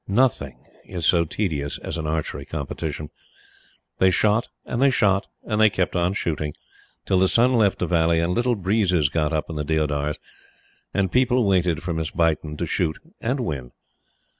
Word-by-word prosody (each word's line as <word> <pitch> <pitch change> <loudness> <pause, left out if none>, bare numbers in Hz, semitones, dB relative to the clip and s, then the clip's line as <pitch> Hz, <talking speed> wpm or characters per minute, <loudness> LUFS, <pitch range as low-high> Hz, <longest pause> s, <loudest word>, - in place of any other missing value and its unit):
Nothing 100 - 0 0.2
is 90 -3 -4
so 85 -2 +4
tedious 75 -6 -2
as - - -5
an 80 -2 -3
archery 75 -3 -2
competition. 75 +1 -5 0.9
They 95 - +5
shot, 105 +4 +2 0.2
and 120 - -2
they 140 - +6
shot, 100 -6 +2 0.2
and 110 -1 -1
they 110 - +7
kept 95 -2 -1
on 90 +1 +1
shooting, 75 -6 -2 0.5
till 95 - +2
the 95 - +4
sun 120 +6 +3
left 110 -5 +3
the - - -1
valley, 85 -1 +2
and 85 +2 0
little 120 +3 +1
breezes 95 -6 +2
got 75 0 0
up 80 -1 -1
in 80 - -6
the 75 - -1
deodars, 75 -1 0 0.7
and 95 -2 0
people 125 -2 +3
waited 90 -4 +1
for 85 0 -2
Miss 80 -1 -2
Beighton 80 -2 0
to 85 - -2
shoot 80 -1 -1 0.2
and 125 +4 -1
win. 70 - -4
85 Hz, 175 wpm, -23 LUFS, 75-105 Hz, 0.9 s, they